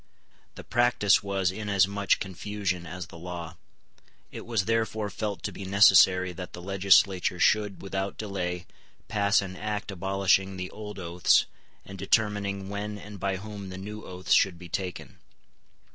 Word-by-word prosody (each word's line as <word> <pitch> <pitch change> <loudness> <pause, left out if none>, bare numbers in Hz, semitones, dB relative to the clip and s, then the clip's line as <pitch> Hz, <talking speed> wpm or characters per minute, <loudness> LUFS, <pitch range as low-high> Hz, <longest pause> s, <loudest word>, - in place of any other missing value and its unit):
The - - -9
practice 120 -4 +3
was 100 -2 0
in 105 +2 -5
as 100 -2 +4
much 100 0 +1
confusion 95 -2 -3
as 90 +1 -6
the 85 0 -13
law. 85 0 -7 0.7
It - - -8
was 110 -5 0
therefore 110 -2 -1
felt 105 -3 -4
to - - -2
be - - -8
necessary 95 -2 +5
that 90 +1 -8
the 90 - -8
legislature 95 -1 +3
should, 105 -1 +2
without 95 0 -3
delay, 90 -4 -3 0.4
pass 100 -1 +2
an 95 -1 -7
Act 105 0 -4
abolishing 95 0 +1
the 90 0 -5
old 105 -1 -8
oaths, 90 -1 +3 0.4
and 95 -1 -10
determining 100 -3 0
when 105 +1 -4
and 105 0 -10
by 100 0 -1
whom 100 0 -8
the 95 - -7
new 105 +3 -7
oaths 90 0 -2
should 95 -3 +4
be 90 0 -11
taken. 90 -5 -5
95 Hz, 160 wpm, -27 LUFS, 90-105 Hz, 0.7 s, necessary